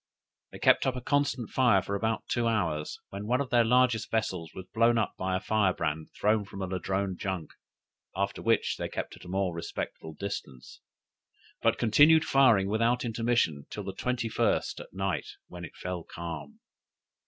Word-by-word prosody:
They - - -9
kept - - +4
up 130 - 0
a 125 - -4
constant 135 -4 0
fire 120 -7 +4
for 100 - -4
about 110 +2 -1
two 120 -1 0
hours, 85 -9 -1
when 100 +2 -6
one 125 +2 +2
of 140 -2 -3
their 120 -1 +5
largest 120 -2 +3
vessels 95 -7 -1
was 95 - -7
blown 115 +1 +4
up 110 - 0
by 95 0 -1
a - - -3
firebrand 90 -7 0
thrown 105 0 +3
from 100 0 -10
a 95 - -1
Ladrone 95 +1 -2
junk; 95 -5 -4 0.6
after 100 +1 -2
which 115 0 +1
they - - -3
kept - - -5
at - - -14
a - - -9
more 95 -1 0
respectful 80 -1 -5
distance, 70 -10 -7 0.8
but - - +3
continued 145 +8 +5
firing 120 -8 +5
without 115 +4 +1
intermission 115 -10 0
till 105 - -6
the 95 0 -5
21st 120 +1 0
at - - -10
night, 95 -6 -2 0.2
when 90 0 -9
it 85 - -9
fell 90 -2 -4
calm. 80 -5 -7
100 Hz, 175 wpm, -29 LUFS, 90-115 Hz, 0.8 s, their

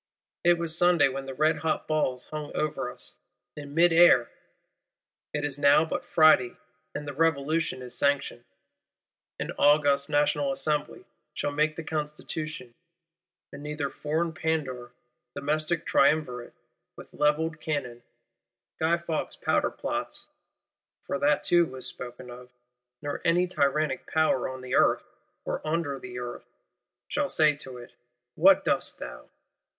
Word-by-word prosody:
It 175 0 +5
was 165 -1 -1
Sunday 175 -4 +4
when 135 +1 -5
the 135 - -5
red 155 +3 +2
hot 160 +1 -2
balls 130 -5 0
hung 150 -1 -5
over 150 -5 -2
us, - - -9 0.4
in 145 -1 -9
mid 170 0 +5
air: 165 -8 +6 1.0
it 150 0 -2
is 145 -1 -4
now 145 +2 +5
but 160 - -3
Friday, 155 -6 +4 0.4
and 150 - -5
"the 145 - -4
Revolution 155 -2 0
is 125 - -8
sanctioned." 140 0 0 1.0
An - - -3
August 145 -1 +4
National 145 -1 +2
Assembly 150 +2 -2 0.3
shall 145 - -1
make 155 +1 +1
the 165 - -6
Constitution; 150 -3 -5 0.8
and 140 - -8
neither 150 -1 -3
foreign 160 +3 -2
Pandour, 140 -7 -2 0.4
domestic 155 +3 -1
Triumvirate, 140 -4 +1 0.4
with - - -13
levelled 155 +1 +1
Cannon, 125 -6 -3 0.8
Guy 165 +2 +2
Faux 170 -2 -3
powder - - +1
plots - - -4 0.8
(for 140 - -2
that 145 +1 +2
too 175 0 +4
was 130 -2 -9
spoken 125 0 -8
of); 125 +1 -11 0.5
nor 145 0 -4
any 175 +1 +3
tyrannic 150 -4 0
Power 160 -5 +1
on 130 0 -7
the 130 0 -6
Earth, - - +3 0.4
or - - -3
under 155 -3 -2
the 125 -1 -8
Earth, 120 0 -7 0.6
shall - - -1
say 155 -2 +3
to 130 -3 -9
it, 120 0 -12 0.4
What 290 - +5
dost - - 0
thou? - - -9
150 Hz, 140 wpm, -27 LUFS, 135-160 Hz, 1.0 s, air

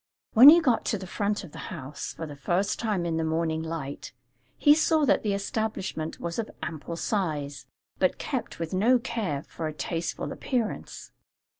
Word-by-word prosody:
When 250 +6 +11
he 335 +3 +9
got 250 -7 +2
to 215 - 0
the 190 - -7
front 205 +3 -1
of 175 - -10
the - - -10
house, 135 +2 -6
for 165 - -5
the 145 -2 -8
first 175 +8 0
time 210 -6 0
in 165 -1 -1
the 165 - 0
morning 160 0 0
light, 160 -4 -5 0.4
he 290 - +7
saw 310 0 +3
that - - +3
the 210 -2 0
establishment 200 -6 -3
was 170 +3 -4
of 225 - -2
ample 165 +1 -5
size, 155 -8 -2 0.3
but - - +2
kept - - -4
with 165 0 -4
no 225 +7 +4
care 220 - -3
for 160 - -5
a 155 - -4
tasteful 165 +3 -3
appearance. 240 -5 -3
175 Hz, 180 wpm, -27 LUFS, 160-220 Hz, 0.4 s, When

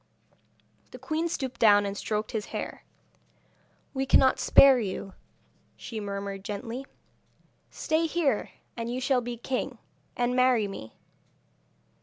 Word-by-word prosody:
The - - -10
queen 320 +1 -2
stooped 260 -7 -4
down 205 -2 +6
and 200 0 -3
stroked 215 +1 -3
his 220 -4 -3
hair. - - -6 1.1
'We 270 0 -2
cannot 260 0 +5
spare 270 -2 +7
you,' 195 -2 -4 0.6
she 225 -3 -6
murmured 200 -1 -5
gently. 230 +6 -5 0.8
'Stay 320 +1 0
here, 300 -9 0 0.3
and 230 0 -4
you 250 - -2
shall 260 -1 +1
be 240 0 -5
king, 255 +2 -3 0.4
and 245 0 +1
marry 255 -4 +3
me.' 110 - -9
240 Hz, 125 wpm, -27 LUFS, 205-265 Hz, 1.1 s, spare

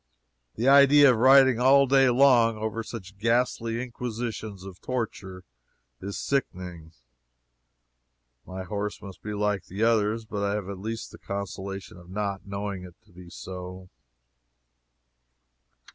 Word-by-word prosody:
The 120 +4 -1
idea 140 0 +7
of 120 - 0
riding 130 0 +6
all 135 +2 +5
day 135 0 +4
long 120 -3 +4
over 110 +1 -3
such 100 -4 -9
ghastly 115 0 0
inquisitions 115 -5 -5
of 95 -2 -11
torture 100 -7 -5 0.6
is 100 +1 -5
sickening. 90 - -3 1.5
My 95 0 -7
horse 100 +3 -4
must 95 -2 -11
be 105 0 -5
like 105 -1 -1
the 100 +4 -4
others, 110 0 +1
but 105 -2 -4
I 100 0 0
have 100 -2 -4
at 100 -2 -6
least 110 +3 -5
the - - -13
consolation 100 -1 -6
of 90 0 -15
not 100 0 -4
knowing 100 -1 -4
it 90 -2 -12
to 105 - -24
be 90 0 -13
so. 90 0 -9
105 Hz, 135 wpm, -26 LUFS, 95-120 Hz, 1.5 s, idea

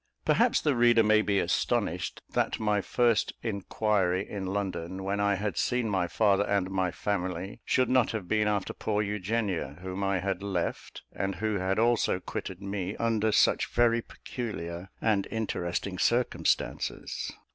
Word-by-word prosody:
Perhaps - - +3
the 145 -3 +2
reader 120 -1 +5
may 110 0 +5
be 100 -2 +1
astonished - - 0
that - - 0
my 105 -2 +1
first 120 +1 +2
inquiry 100 -3 0
in 100 -2 -5
London, 95 -2 -3
when 100 +1 -1
I 100 0 +2
had 100 0 -3
seen 125 -2 +1
my 95 -3 +1
father 100 0 +3
and 100 -2 0
my 95 -1 +1
family, 95 0 -3
should 130 -1 +2
not 130 -1 +3
have 105 -5 -4
been 105 +1 +2
after 105 -2 -1
poor 105 -1 -1
Eugenia, 100 - -2
whom 95 +1 -4
I 95 -1 +1
had 95 0 -2
left, 95 -4 -3
and 95 +1 -2
who 105 +1 -1 0.2
also 120 0 +3
had 90 - -5
quitted 95 +1 -5
me, 100 0 -3
under 110 -2 +1
such - - +3
very 120 -1 +3
peculiar 95 -8 -6
and 105 -3 +1
interesting 95 -4 -2
circumstances. 120 +1 0
100 Hz, 155 wpm, -29 LUFS, 95-110 Hz, 0.2 s, reader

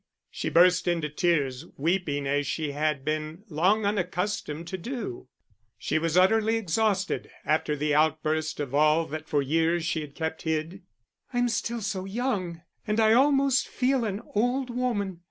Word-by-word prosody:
She - - -3
burst 180 +1 +4
into 165 -3 0
tears, 150 -4 0
weeping 155 -2 0
as 145 0 0
she 150 0 -2
had 145 -1 -1
been 155 +4 -3
long 185 +7 +2
unaccustomed 180 -4 -2
to 190 - -4
do; 215 - -5 0.5
she 155 - -1
was 165 +1 0
utterly 220 +4 +4
exhausted 200 0 0 0.2
after 155 -1 +1
the 150 +1 0
outburst 155 +1 +1
of 140 -3 -4
all 155 +3 +4
that 155 +1 -6
for 145 -2 +2
years 165 +3 +1
she 160 -1 -1
had 145 -2 -9
kept 160 -1 -3
hid. 160 +4 -2 0.5
"I'm 245 0 +2
still 235 +1 -2
so 195 -2 -3
young, 195 -6 -2 0.3
and 210 +1 0
I 220 0 +5
almost 275 +1 +3
feel 255 0 +1
an 205 -1 -3
old 245 +4 0
woman. 215 -7 -2
170 Hz, 155 wpm, -27 LUFS, 155-215 Hz, 0.5 s, I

